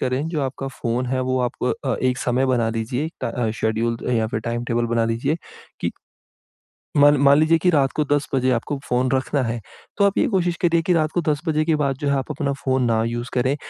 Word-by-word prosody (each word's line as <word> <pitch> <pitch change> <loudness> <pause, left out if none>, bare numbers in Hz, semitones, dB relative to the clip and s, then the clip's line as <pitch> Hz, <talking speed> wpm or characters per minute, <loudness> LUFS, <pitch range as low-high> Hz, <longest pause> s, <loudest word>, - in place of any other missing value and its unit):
करें 130 +4 -1
जो 165 -3 -2
आपका 135 0 -4
फ़ोन 125 -1 -2
है 130 +1 -1
वो 130 0 0
आप 125 -1 0 0.3
अ, 130 - +1
एक 130 -1 +1
समय 130 +2 +1
बना 120 -3 +1
लीजिए 120 +7 -2
टा - - -1
अ, 115 -1 -1
शेड्यूल 110 +1 -1
अ, - - 0
या 110 -2 +2
फिर 110 0 -3
टाइमटेबल 120 +1 -1
बना 115 -1 +2
लीजिए 115 +7 0 0.4
कि - - -1 1.1
...मान 145 0 +6
मान 140 +1 +6
लीजिए 155 +1 +4
कि 180 - +5
रात 140 -5 +3
को 155 - +2
10 145 0 +2
बजे 130 -1 +2
आपको 125 +4 -1
फ़ोन 125 +1 +1
रखना 135 +1 0
है, 115 0 -2 0.4
तो 200 - +4
आप 200 - +1
ये - - +4
कोशिश 180 -5 +1
करिए 170 -1 +3
कि 180 +2 +1
रात 155 -2 +1
को 175 - +1
10 150 -1 0
बजे 155 0 +1
के 160 -1 +2
बाद 140 -3 0
जो 145 - -3
है 140 - +2
आप 135 +3 -3
अपना 140 -1 -1
फोन 130 -1 +1
ना 115 -1 +2
यूज़ 120 +2 -3
करें। 130 +3 +1
130 Hz, 235 wpm, -22 LUFS, 120-150 Hz, 1.1 s, मान